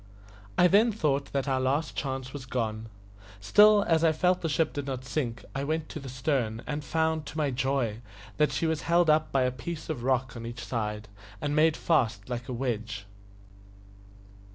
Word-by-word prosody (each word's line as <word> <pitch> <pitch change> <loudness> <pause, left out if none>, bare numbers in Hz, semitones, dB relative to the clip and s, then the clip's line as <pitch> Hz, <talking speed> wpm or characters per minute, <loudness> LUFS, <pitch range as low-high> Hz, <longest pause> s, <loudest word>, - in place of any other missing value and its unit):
I 180 - +6
then 215 +6 +5
thought 145 -9 -1
that 140 0 -1
our 130 -1 +1
last 140 +4 0
chance 130 -2 -4
was 135 -3 -7
gone. 110 -3 -3 0.5
Still, 210 - +6
as 165 -1 +3
I 165 - +5
felt 180 +3 +1
the 165 - -1
ship 155 +1 +1
did 145 -1 -4
not 130 -1 -4
sink, 125 -4 -3
I 135 - -2
went 155 +1 -2
to - - -6
the 135 -2 -8
stern, 125 -4 -1
and 150 0 -3
found, 160 0 0
to 155 - -8
my 150 -3 +1
joy, 130 -4 -1 0.4
that 150 -2 +3
she 135 +5 -1
was 160 -2 0
held 170 -1 +3
up 155 0 +2
by 135 -1 +2
a 125 - +1
piece 155 +6 -6
of 150 -7 -3
rock 130 -1 0
on 115 - -7
each 120 +1 -6
side, 105 -3 -3 0.3
and 145 0 -1
made 155 0 +4
fast 115 -10 +1
like 120 0 -4
a - - -2
wedge. 115 -4 -3
135 Hz, 195 wpm, -28 LUFS, 125-155 Hz, 0.5 s, I